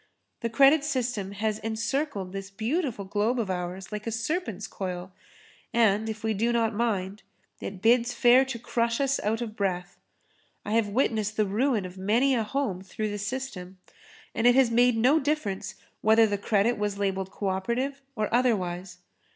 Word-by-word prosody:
The 230 - -2
credit 275 +5 +5
system 245 -9 -2
has 215 +1 -1
encircled 225 -2 -2
this 195 0 -6
beautiful 225 - -2
globe 210 +5 0
of 210 -5 -1
ours 180 +2 -5
like 210 +1 -5
a - - -1
serpent's 225 - -2
coil, 185 -1 -5 0.6
and 220 -1 +3
if 220 0 -6
we 220 0 +1
do 230 +4 +1
not 230 -1 +1
mind, 205 -3 -1 0.4
it 190 -2 -7
bids 240 +1 +4
fair 245 +2 +5
to 265 -3 -5
crush 235 0 -1
us 275 0 +1
out 220 +3 -1
of 220 -3 -5
breath. 180 -3 -2 0.7
I 205 - -4
have 225 -1 +2
witnessed 215 -2 0
the 215 - +3
ruin 215 +1 +1
of 185 +1 -9
many 235 +8 +2
a 240 - +2
home 220 -4 -2
through 210 +2 -4
the 205 - -4
system, 200 -5 -5 0.6
and 235 - +2
it 245 - +6
has 260 -3 +4
made 240 0 +4
no 260 +8 +4
difference 270 -10 -2 0.3
whether 220 +1 +5
the 205 -2 -1
credit 210 +2 +1
was 205 -1 -1
labelled 195 -1 -1
co 200 0 -3
operative 240 +9 -2
or 215 -2 0
otherwise. 185 -7 0
220 Hz, 175 wpm, -27 LUFS, 195-245 Hz, 0.7 s, it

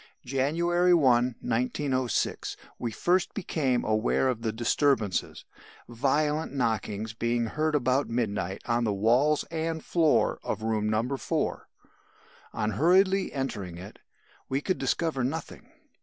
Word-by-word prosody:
"January 170 +7 +2
1, 125 -5 +3
1906, 130 +1 -1 0.2
we 120 - -2
first 175 - +1
became 140 - 0
aware 110 +4 +1
of 120 -3 -2
the 115 -1 -1
disturbances 115 -3 0 0.4
violent 150 +6 0
knockings 110 -4 -2
being 115 +1 0
heard 155 +6 -1
about 130 0 +1
midnight 105 -5 -2
on 120 0 +1
the 110 - +1
walls 120 +9 +2
and 160 -1 -3
floor 165 -3 +2
of - - -4
room 110 -1 0
No. 115 +5 0
4. 110 -3 -2 0.8
On 110 -1 -1
hurriedly 185 - +3
entering 100 - -4
it, 95 +3 -11 0.5
we 135 - 0
could 185 +5 -2
discover 160 -6 0
nothing. 145 +5 -5
130 Hz, 125 wpm, -28 LUFS, 110-155 Hz, 0.8 s, 1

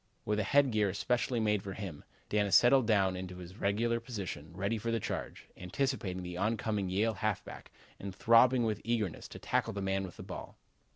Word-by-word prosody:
With 105 0 0
a - - +1
head 140 +6 +4
gear, 105 -2 +2
especially 120 +5 0
made 105 -2 +1
for 95 0 -6
him, 95 -8 -7 0.2
Dana 105 -1 +1
settled 125 +1 +6
down 95 -4 +3
in 90 0 -5
his 90 +1 -10
regular 115 +4 +1
position, 95 - -6
ready 100 +4 -1
for 115 +2 -3
the 115 0 +1
charge, - - -5
anticipating 95 -1 -2
the 90 0 -6
oncoming 105 -1 -1
Yale 105 +5 +1
halfback 105 0 -4 0.3
and 95 -1 -6
throbbing 120 +3 +5
with 110 -2 -1
eagerness 110 -6 -2
to - - -10
tackle - - -1
the 100 - -4
man 95 0 0
with 90 -3 -8
the - - -8
ball. - - -8
105 Hz, 190 wpm, -32 LUFS, 95-115 Hz, 0.3 s, settled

